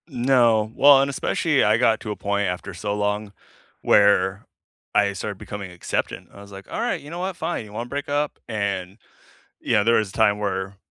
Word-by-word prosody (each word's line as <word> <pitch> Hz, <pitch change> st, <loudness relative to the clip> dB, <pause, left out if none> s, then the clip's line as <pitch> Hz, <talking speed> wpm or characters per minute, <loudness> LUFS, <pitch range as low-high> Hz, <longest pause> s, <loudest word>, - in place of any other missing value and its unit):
No, 120 Hz, -5 st, +2 dB
well, 140 Hz, -1 st, +7 dB
and 140 Hz, -, 0 dB
especially, 150 Hz, +1 st, +1 dB
I 105 Hz, +1 st, +4 dB
got 115 Hz, -2 st, +3 dB
to 105 Hz, -, -5 dB
a -, -, -3 dB
point 100 Hz, 0 st, -1 dB
after 90 Hz, +2 st, -4 dB
so 95 Hz, +5 st, -3 dB
long 105 Hz, 0 st, -2 dB, 0.5 s
where 100 Hz, -1 st, +3 dB, 0.5 s
I 100 Hz, -1 st, +3 dB
started 100 Hz, +1 st, -5 dB
becoming 100 Hz, -1 st, -7 dB
acceptant. 90 Hz, -1 st, -4 dB
I 100 Hz, -, -12 dB
was 100 Hz, 0 st, -14 dB
like, 95 Hz, 0 st, -11 dB
"Alright, -, -, -2 dB
you 145 Hz, -, -11 dB
know 170 Hz, +2 st, -6 dB
what? 185 Hz, 0 st, -3 dB
Fine, 165 Hz, -9 st, -3 dB
you 105 Hz, -, -14 dB
wanna 115 Hz, +3 st, -5 dB
break 145 Hz, +1 st, -4 dB
up?"and, 105 Hz, -10 st, -3 dB, 0.6 s
yeah, 105 Hz, -, +1 dB
there 115 Hz, +2 st, +3 dB
was 110 Hz, -2 st, +1 dB
a -, -, -13 dB
time 105 Hz, 0 st, +3 dB
where 100 Hz, -1 st, -3 dB
105 Hz, 195 wpm, -23 LUFS, 100-125 Hz, 0.6 s, well